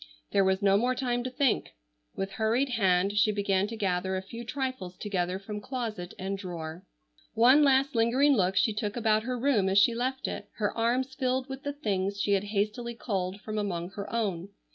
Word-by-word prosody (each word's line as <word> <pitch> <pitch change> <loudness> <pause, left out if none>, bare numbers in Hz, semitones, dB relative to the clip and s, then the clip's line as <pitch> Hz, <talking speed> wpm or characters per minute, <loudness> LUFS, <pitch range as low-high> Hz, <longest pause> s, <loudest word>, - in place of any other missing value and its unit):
There 200 - +4
was 190 +1 +1
no 195 0 +5
more 250 +4 +1
time 245 -1 -1
to - - -1
think. 255 - 0 0.4
With 195 0 -3
hurried 225 +6 +1
hand 195 -4 +2
she 215 +1 +4
began 200 -1 +1
to 230 - -6
gather 190 -2 -1
a 185 - -4
few 230 +5 -8
trifles 255 -8 -4
together 185 -3 -2
from 210 +1 -6
closet 220 -7 -5
and 195 +1 -3
drawer. 170 -2 -6 0.5
One 250 +6 +6
last 275 -1 +4
lingering 250 +5 +4
look 190 -5 +2
she 220 - +3
took 210 0 -3
about 220 -2 +2
her 250 +2 -3
room 235 -7 +2
as 190 - +2
she 205 +4 +6
left 255 +3 -2
it, - - -6
her 210 -2 -1
arms 250 +3 0
filled 260 0 -1
with 270 0 -6
the 285 0 -3
things 200 -7 -2
she 205 - 0
had 200 0 +2
hastily 215 +3 -2
culled 195 -3 -3
from 215 -1 -3
among 180 -3 -3
her 200 +1 -7
own. 200 -6 -2
215 Hz, 200 wpm, -28 LUFS, 195-245 Hz, 0.5 s, One